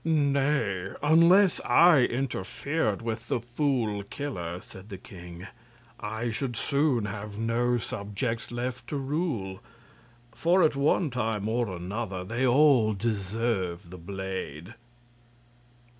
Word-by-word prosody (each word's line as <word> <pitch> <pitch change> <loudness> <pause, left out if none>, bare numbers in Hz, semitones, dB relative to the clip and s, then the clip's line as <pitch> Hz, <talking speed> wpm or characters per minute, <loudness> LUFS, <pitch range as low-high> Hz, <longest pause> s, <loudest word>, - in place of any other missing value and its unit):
"Nay, 140 - +1
unless 170 +5 +5
I 170 -3 +6
interfered 125 - -1
with 115 0 -4
the - - 0
Fool 120 -4 -1
Killer," 95 - -5
said 95 +2 -13
the 95 - -6
king, 90 -1 -11 0.5
"I 110 +2 -3
should 120 +1 -3
soon 140 -4 +1
have 105 0 -6
no 120 +2 +1
subjects 115 +2 -3
left 120 +1 -4
to 145 - -3
rule; 135 - -2 0.7
for 170 +9 +3
at 155 -2 +3
one 145 +2 +2
time 110 -4 -1
or 120 +1 0
another 95 +2 -4
they 120 +7 0
all 125 -4 +5
deserve 100 -4 -2
the 90 - -9
blade." 95 -1 -6
115 Hz, 115 wpm, -28 LUFS, 100-140 Hz, 0.7 s, I